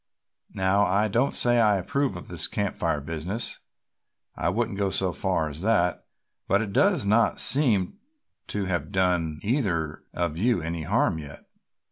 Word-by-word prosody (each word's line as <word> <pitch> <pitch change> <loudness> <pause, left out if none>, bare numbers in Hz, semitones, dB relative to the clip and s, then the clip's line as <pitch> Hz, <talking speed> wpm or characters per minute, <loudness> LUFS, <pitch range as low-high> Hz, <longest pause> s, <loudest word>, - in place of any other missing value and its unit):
Now 95 +2 +2
I 100 +4 +2
don't 120 +6 +1
say 120 0 +3
I 105 -3 +4
approve 140 +9 -1
of - - -8
this - - 0
Camp - - -2
Fire 75 - -1
business, 85 +9 -4 0.8
I - - 0
won't 110 +2 -1
go 100 0 0
so 95 -1 0
far 90 -3 0
as 75 +2 -7
that, 95 -4 +1 0.4
but 100 - +3
it 105 -2 -3
does 185 - +3
not 110 +2 +3
seem 125 - +2 0.5
to 105 -1 -2
have 90 -2 -2
done 90 -5 +1
either 95 - -1
of 85 -2 -2
you 120 +1 +2
any 80 -1 -4
harm 80 - +1
yet." 75 -2 -10
95 Hz, 160 wpm, -26 LUFS, 85-110 Hz, 0.8 s, I